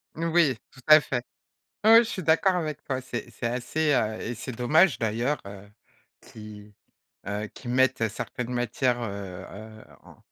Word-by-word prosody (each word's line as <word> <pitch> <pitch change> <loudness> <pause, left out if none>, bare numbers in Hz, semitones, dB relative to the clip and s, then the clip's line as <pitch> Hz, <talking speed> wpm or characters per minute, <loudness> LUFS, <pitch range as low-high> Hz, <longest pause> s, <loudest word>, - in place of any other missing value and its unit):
Oui, 165 -4 +2 0.2
tout - - -17
à 155 0 +9
fait. 125 -4 -3 0.6
Ouais, 225 +2 +8
je 225 - -6
suis 185 - -4
d'accord 165 +4 +3
avec 155 -4 -3
toi, 130 -1 -3
c'est 130 - -6
c'est - - -7
assez, 125 +6 -1
heu, 110 -4 0
et 120 - -4
c'est 130 - -6
dommage 150 +10 +3
d'ailleurs, 115 +6 -1
heu, 100 0 -11 0.5
qui, 105 -1 -12 0.5
heu, 105 +1 -3
qu'ils 120 - -7
mettent 130 -2 +2
certaines 125 +4 -5
matières, 120 +1 0
heu, 100 -4 -6
heu, 110 +1 -11 0.2
en - - -17
125 Hz, 165 wpm, -26 LUFS, 110-150 Hz, 0.6 s, à